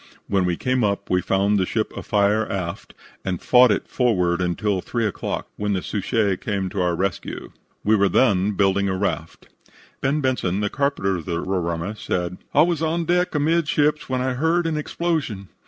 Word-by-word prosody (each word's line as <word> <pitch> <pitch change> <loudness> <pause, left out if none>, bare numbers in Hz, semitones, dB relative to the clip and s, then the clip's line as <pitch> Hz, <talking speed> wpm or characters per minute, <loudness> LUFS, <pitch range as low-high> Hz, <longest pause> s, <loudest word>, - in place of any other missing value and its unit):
When 95 -2 +1
we 90 -1 0
came 130 -1 0
up 100 -1 -1
we 90 0 +3
found 100 +2 +2
the 95 - +2
ship 110 -1 -1
afire 105 +1 +1
aft, 90 -4 -5 0.3
and 90 -3 -2
fought 125 0 +6
it 100 - 0
forward 90 -8 +1
until 95 +2 0
3 115 +3 -2
o'clock, 105 - -3
when 105 0 -1
the 95 - -2
Suchet 105 -2 0
came 100 -2 -2
to 95 0 -2
our 90 -1 +1
rescue. 95 0 -3 0.3
We 110 +2 +4
were 100 -1 +3
then 100 -2 +3
building 100 0 +2
a 95 - 0
raft." 85 -4 -3 0.5
"Ben" 140 +3 +1
Benson, 125 -9 0
the 105 - -1
carpenter 135 -10 0
of 85 - -8
the 85 -2 -2
Roraima, 90 +1 -2
said: 90 -3 -3
"I - - +5
was 170 -2 0
on 165 +1 0
deck, 180 0 +1
amidships, 150 -1 +1
when 130 -1 0
I 130 0 0
heard 165 +6 +1
an 165 -1 0
explosion. 150 - -2
105 Hz, 185 wpm, -22 LUFS, 95-130 Hz, 0.5 s, fought